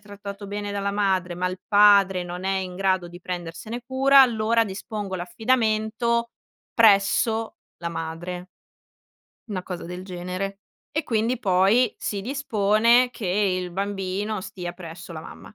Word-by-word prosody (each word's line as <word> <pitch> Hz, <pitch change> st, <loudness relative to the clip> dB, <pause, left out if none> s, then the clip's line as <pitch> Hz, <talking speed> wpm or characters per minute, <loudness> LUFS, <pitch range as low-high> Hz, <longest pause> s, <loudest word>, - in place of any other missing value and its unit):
trattato 200 Hz, 0 st, -9 dB
bene 205 Hz, 0 st, -4 dB
dalla 200 Hz, 0 st, -1 dB
madre, 190 Hz, -3 st, 0 dB
ma 180 Hz, 0 st, -1 dB
il 185 Hz, 0 st, -4 dB
padre 200 Hz, -3 st, +5 dB
non 175 Hz, +1 st, -6 dB
è 195 Hz, 0 st, 0 dB
in 185 Hz, -1 st, -5 dB
grado 190 Hz, -2 st, +1 dB
di 175 Hz, +1 st, -11 dB
prendersene 180 Hz, +6 st, -6 dB
cura, 270 Hz, +1 st, +5 dB
allora, 230 Hz, -2 st, +3 dB
dispongo 200 Hz, 0 st, -5 dB
l'affidamento 225 Hz, +4 st, 0 dB, 0.4 s
presso 220 Hz, +1 st, +4 dB, 0.2 s
la 170 Hz, -, -4 dB
madre." 170 Hz, +2 st, -5 dB, 1.0 s
Una 185 Hz, -3 st, -3 dB
cosa 180 Hz, -3 st, -6 dB
del 180 Hz, +2 st, -7 dB
genere. 185 Hz, +2 st, -5 dB, 0.3 s
E, 310 Hz, 0 st, -2 dB
quindi, 230 Hz, +1 st, 0 dB
poi, 200 Hz, +4 st, +3 dB
si 200 Hz, -, -3 dB
dispone 235 Hz, 0 st, +3 dB
che 230 Hz, -4 st, -6 dB
il 185 Hz, -1 st, 0 dB
bambino 195 Hz, +2 st, -3 dB
stia 185 Hz, -2 st, -6 dB
presso 170 Hz, -1 st, -10 dB
la 155 Hz, -, -6 dB
mamma. 165 Hz, -, -12 dB
200 Hz, 140 wpm, -24 LUFS, 180-220 Hz, 1.0 s, padre